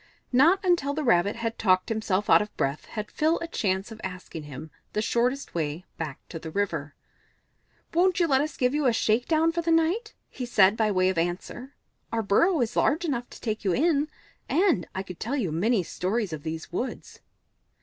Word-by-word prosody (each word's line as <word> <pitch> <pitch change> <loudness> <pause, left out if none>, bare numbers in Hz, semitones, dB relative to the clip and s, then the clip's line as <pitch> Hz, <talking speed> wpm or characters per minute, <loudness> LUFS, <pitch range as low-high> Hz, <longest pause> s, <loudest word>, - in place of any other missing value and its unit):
Not 335 +10 +4
until 310 -6 +2
the 310 - -2
Rabbit 205 -5 +3
had 230 -1 -4
talked 185 -3 +3
himself 215 -3 0
out - - +6
of 210 - -6
breath 140 +2 -1
had 215 -1 -6
Phil 315 +2 +2
a 335 - -4
chance 195 - -1
of 220 -1 -10
asking 180 -4 -7
him 145 +2 -9 0.2
the 210 - 0
shortest 250 +5 0
way 160 +1 -3
back 155 -4 -6
to 165 - -6
the 160 - -7
river. 160 -6 -2 1.0
"Won't 360 +1 +3
you 345 - +4
let 270 -4 +3
us 305 0 -3
give 250 +1 +2
you 295 -2 +2
a 240 - +3
shake 225 +2 +1
down 325 0 +3
for 340 +1 -1
the 335 - -2
night?" 335 +8 +1
he 250 - -6
said 200 -3 +5
by 220 -1 +1
way 185 -2 +2
of 185 -3 0
answer. 180 +10 -4 0.4
"Our 225 -1 0
burrow 320 - +3
is 230 - -1
large 320 +5 +2
enough 245 -6 -2
to - - -12
take 220 -2 -3
you 190 -3 +1
in, 305 0 +2 0.4
and 345 - +2
I 190 - -2
could 180 -3 -10
tell 240 +6 -2
you 210 - -1
many 195 +5 +1
stories 190 +2 -2
of 155 - -5
these 160 +2 -6
woods." 240 +9 -5
225 Hz, 205 wpm, -26 LUFS, 185-290 Hz, 1.0 s, out